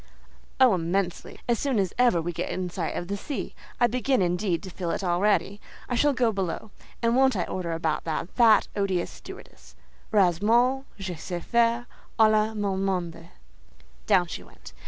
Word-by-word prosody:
"Oh, 255 Hz, -4 st, +6 dB
immensely! 180 Hz, +1 st, -2 dB
as 235 Hz, -2 st, +1 dB
soon 275 Hz, -4 st, 0 dB
as 190 Hz, -3 st, 0 dB
ever 245 Hz, -8 st, +4 dB
we 175 Hz, +1 st, -3 dB
get -, -, -3 dB
in 180 Hz, -1 st, -3 dB
sight 170 Hz, -2 st, -3 dB
of 175 Hz, -, -4 dB
the 200 Hz, -, -2 dB
sea: 275 Hz, +8 st, -5 dB, 0.3 s
I 240 Hz, -, +5 dB
begin, 255 Hz, +3 st, +1 dB
indeed, 180 Hz, 0 st, 0 dB
to 190 Hz, -, -8 dB
feel 175 Hz, -1 st, -4 dB
it 195 Hz, -, -2 dB
already. 200 Hz, +3 st, +1 dB, 0.3 s
I -, -, -3 dB
shall 290 Hz, +4 st, +3 dB
go 245 Hz, -3 st, +2 dB
below; 195 Hz, +1 st, -4 dB, 0.3 s
and 230 Hz, +1 st, +3 dB
won't 265 Hz, -1 st, +4 dB
I 180 Hz, -, 0 dB
order 175 Hz, -2 st, -4 dB
about 160 Hz, -2 st, -1 dB
that 160 Hz, 0 st, -2 dB
fat 230 Hz, -3 st, +5 dB
odious 190 Hz, -3 st, -1 dB
stewardess! -, -, -13 dB, 0.4 s
Heureusement 220 Hz, +8 st, +3 dB
je 190 Hz, -3 st, -5 dB
sais 175 Hz, +1 st, -6 dB
faire 235 Hz, 0 st, +2 dB, 0.3 s
aller 215 Hz, 0 st, +4 dB
mon 195 Hz, -2 st, -1 dB
monde." 175 Hz, -3 st, -3 dB, 0.8 s
Down 180 Hz, -, +4 dB
she 170 Hz, -, -7 dB
went. -, -, -15 dB
195 Hz, 175 wpm, -26 LUFS, 175-235 Hz, 0.8 s, Oh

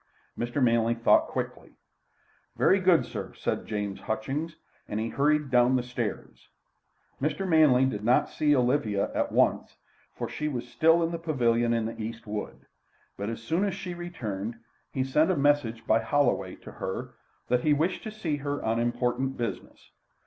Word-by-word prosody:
Mr. 120 Hz, +4 st, -1 dB
Manley 115 Hz, -1 st, +3 dB
thought 115 Hz, -, +4 dB
quickly. -, -, -5 dB, 0.8 s
"Very -, -, +4 dB
good, -, -, +4 dB
sir," -, -, -6 dB
said -, -, -3 dB
James 105 Hz, -2 st, -3 dB
Hutchings, 140 Hz, +9 st, -3 dB, 0.3 s
and 105 Hz, -, -3 dB
he 115 Hz, +1 st, -2 dB
hurried 145 Hz, +2 st, +1 dB
down 125 Hz, +1 st, +4 dB
the 125 Hz, -, +1 dB
stairs. 120 Hz, -4 st, -5 dB, 0.7 s
Mr. 155 Hz, +7 st, -1 dB
Manley 150 Hz, -6 st, +5 dB
did 105 Hz, -6 st, -2 dB
not 120 Hz, +3 st, +3 dB
see 150 Hz, -1 st, +2 dB
Olivia 125 Hz, -6 st, +1 dB
at -, -, -1 dB
once, -, -, +1 dB, 0.4 s
for -, -, -3 dB
she 150 Hz, -, -3 dB
was 125 Hz, -4 st, -3 dB
still 165 Hz, +8 st, +3 dB
in 165 Hz, -, 0 dB
the 170 Hz, -, -3 dB
pavilion 120 Hz, -7 st, +1 dB
in 115 Hz, -1 st, +1 dB
the 115 Hz, 0 st, -5 dB
East 115 Hz, +1 st, -6 dB
wood. 105 Hz, 0 st, -6 dB, 0.5 s
But 100 Hz, +2 st, -4 dB
as 115 Hz, -, -6 dB
soon 170 Hz, +5 st, 0 dB
as 200 Hz, -2 st, 0 dB
she 185 Hz, -2 st, -5 dB
returned, 115 Hz, -, -5 dB, 0.4 s
he 130 Hz, -, -1 dB
sent 150 Hz, +5 st, +2 dB
a 185 Hz, -, +1 dB
message 140 Hz, -6 st, +1 dB
by 110 Hz, -, +4 dB
Holloway 115 Hz, -6 st, +1 dB
to -, -, -9 dB
her, -, -, -5 dB, 0.4 s
that 125 Hz, 0 st, +3 dB
he 155 Hz, -, +2 dB
wished 165 Hz, +6 st, 0 dB
to 215 Hz, -, -6 dB
see 175 Hz, -9 st, -2 dB
her 145 Hz, 0 st, -3 dB
on 115 Hz, +1 st, 0 dB
important 125 Hz, +2 st, -1 dB
business. 120 Hz, -1 st, -6 dB
125 Hz, 170 wpm, -28 LUFS, 115-150 Hz, 0.8 s, Manley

